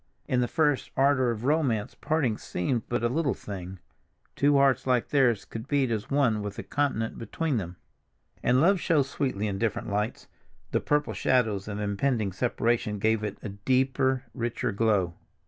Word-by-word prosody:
In 125 -1 +1
the 120 - +1
first 150 -2 +1
ardor 135 -2 +3
of 115 -1 -3
romance 135 -8 +1
parting 145 -8 0
seemed 115 +5 -3
but 120 0 -1
a - - +4
little 140 +2 0
thing—two 100 +9 -3
hearts 135 -2 +3
like 125 -2 +2
theirs 125 -7 +3
could 115 0 -7
beat 140 -4 +1
as 110 -2 -2
one 125 -7 +2
with 105 -1 -5
a - - -5
continent 135 -6 -1
between 145 +4 -2
them. 90 -3 -4 0.7
And 125 +1 +3
love 190 +3 +4
shows 150 -6 +2
sweetly 130 -7 -2
in 100 -2 -2
different 115 -1 -1
lights; 105 +2 -2 0.5
the - - +2
purple 150 0 0
shadows 110 -7 +1
of 105 -1 -4
impending 105 +1 0
separation 115 0 0
gave 110 +1 +1
it 105 -2 -3
a - - -4
deeper, 130 +5 +1
richer 120 -2 -2
glow. 100 -4 +1
120 Hz, 165 wpm, -27 LUFS, 105-135 Hz, 0.7 s, a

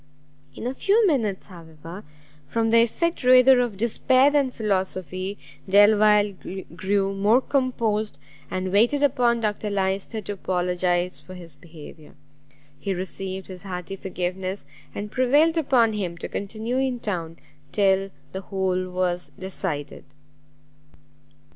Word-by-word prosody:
In - - -7
a 250 - -1
few 415 - +3
minutes, 230 - 0
however, 165 +1 -11 0.4
from 225 +6 0
the 230 0 +6
effect 335 +8 0
rather 255 +1 +7
of 240 -5 -1
despair 255 +5 +3
than 285 -3 +2
philosophy, 190 -3 -2 0.3
Delvile 205 0 +5 0.4
grew 195 +1 0
more 205 +5 +4
composed, 230 - -1 0.3
and 185 0 -3
waited 240 +9 +3
upon 240 -4 +2
Dr 210 -1 -1
Lyster 195 +2 -1
to 205 - -6
apologize 180 -1 -1
for 185 - -12
his 170 -3 -6
behaviour. 155 0 -14 0.6
He 195 +6 -2
received 190 +1 -5
his 185 -2 -9
hearty 185 0 -6
forgiveness, 185 +1 -3 0.3
and 210 +1 -5
prevailed 290 +7 +3
upon 255 -8 +3
him 180 -5 -3
to - - -5
continue 220 +5 -4
in 260 -2 -1
town 170 -7 -4 0.3
till 195 -1 +2 0.2
the 190 - -5
whole 185 -1 -1
was 180 -1 -1
decided. 185 -6 -4
200 Hz, 125 wpm, -24 LUFS, 185-235 Hz, 0.6 s, rather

